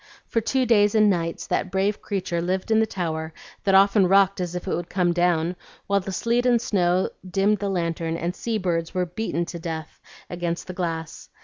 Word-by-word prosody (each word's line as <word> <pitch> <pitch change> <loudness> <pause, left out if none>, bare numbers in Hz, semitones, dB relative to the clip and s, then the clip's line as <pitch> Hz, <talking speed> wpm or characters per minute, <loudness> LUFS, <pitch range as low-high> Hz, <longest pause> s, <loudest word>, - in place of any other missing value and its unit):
For 230 - 0
two 260 +3 +1
days 210 -3 +4
and 215 -1 +5
nights 165 -2 -2
that 190 - -1
brave 195 +2 0
creature 185 -4 -2
lived 185 +5 -2
in 220 - +5
the 220 - +2
tower, 160 -4 -4 0.3
that 195 -1 +4
often 195 0 +5
rocked 195 0 +4
as 180 -1 -3
if 180 - -5
it - - 0
would 175 0 -5
come 180 -2 +1
down, 175 0 +1 0.3
while 200 0 +2
the 195 0 -6
sleet 235 +5 +1
and 240 -1 +4
snow 185 -5 +1 0.2
dimmed 200 +2 +2
the 200 - -2
lantern, 165 -2 -1
and 175 +2 -3
sea 230 -2 -2
birds 170 -3 -2
were 180 0 +1
beaten 175 -2 -2
to 170 0 -7
death 160 -2 -6 0.3
against 175 -1 -3
the 185 - -7
glass. 165 -3 -4
185 Hz, 205 wpm, -24 LUFS, 170-205 Hz, 0.3 s, and